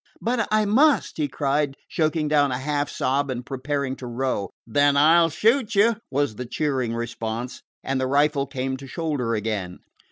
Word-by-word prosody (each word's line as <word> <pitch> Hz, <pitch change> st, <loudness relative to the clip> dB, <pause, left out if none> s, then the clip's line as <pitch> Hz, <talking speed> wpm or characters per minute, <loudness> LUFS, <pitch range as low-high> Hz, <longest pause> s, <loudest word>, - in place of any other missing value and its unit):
"But 230 Hz, -1 st, 0 dB
I 215 Hz, 0 st, +2 dB
must!" 275 Hz, +8 st, +3 dB
he 150 Hz, -2 st, 0 dB
cried, 140 Hz, 0 st, -1 dB
choking 155 Hz, -1 st, 0 dB
down 145 Hz, -2 st, +3 dB
a 125 Hz, -, -1 dB
half 145 Hz, +2 st, -1 dB
sob 140 Hz, +2 st, 0 dB
and 125 Hz, -1 st, -4 dB
preparing 135 Hz, 0 st, -3 dB
to 125 Hz, -, -8 dB
row. 120 Hz, -4 st, -2 dB, 0.2 s
"Then 145 Hz, +4 st, +3 dB
I 160 Hz, +4 st, +6 dB
'll 165 Hz, -, +3 dB
shoot 225 Hz, -, +1 dB
you," 225 Hz, +3 st, +4 dB
was 145 Hz, -4 st, 0 dB
the 125 Hz, -, -5 dB
cheering 130 Hz, -5 st, -1 dB
response, 115 Hz, +1 st, -4 dB, 0.2 s
and 135 Hz, -1 st, -1 dB
the 130 Hz, -, 0 dB
rifle 140 Hz, +1 st, +2 dB
came 130 Hz, -1 st, -3 dB
to 135 Hz, +1 st, -10 dB
shoulder 135 Hz, -6 st, -2 dB
again. 105 Hz, -4 st, -3 dB
140 Hz, 180 wpm, -24 LUFS, 130-155 Hz, 0.2 s, I